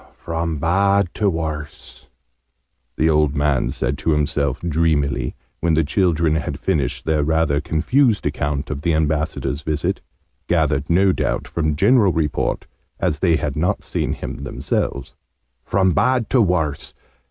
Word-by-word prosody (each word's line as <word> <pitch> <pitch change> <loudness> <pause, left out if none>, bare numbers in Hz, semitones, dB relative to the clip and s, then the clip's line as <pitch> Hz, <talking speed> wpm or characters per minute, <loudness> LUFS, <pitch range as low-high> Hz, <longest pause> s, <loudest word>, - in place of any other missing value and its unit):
"From 85 -1 -3
bad 100 +4 +2
to 105 -2 +1
worse!" 80 -4 -6 0.9
the 80 - +2
old 75 -2 +2
man 70 -4 +1
said 65 +1 -2
to 80 - +1
himself, 70 -3 0
dreamily, 80 -4 0 0.2
when 85 -1 +1
the 80 - +3
children 85 -1 +1
had 75 - -3
finished 70 -6 -1
their 80 -1 +1
rather 75 -1 +1
confused 115 - +1
account 75 0 -2
of 70 -2 -4
the 85 -1 +1
Ambassador's 75 -1 -1
visit, 75 -1 -2 0.5
gathered 70 +2 +1
no 95 +3 +4
doubt - - -1
from 75 -2 -1
general 100 - +4
report, 75 -3 -1 0.3
as 75 - 0
they 85 -1 +3
had 75 -4 -2
not 85 +4 0
seen - - -2
him - - -6
themselves. - - -3 0.5
"From 95 +3 +2
bad 125 +6 +1
to 130 - +4
worse! 80 -7 -1
80 Hz, 140 wpm, -20 LUFS, 75-85 Hz, 0.9 s, no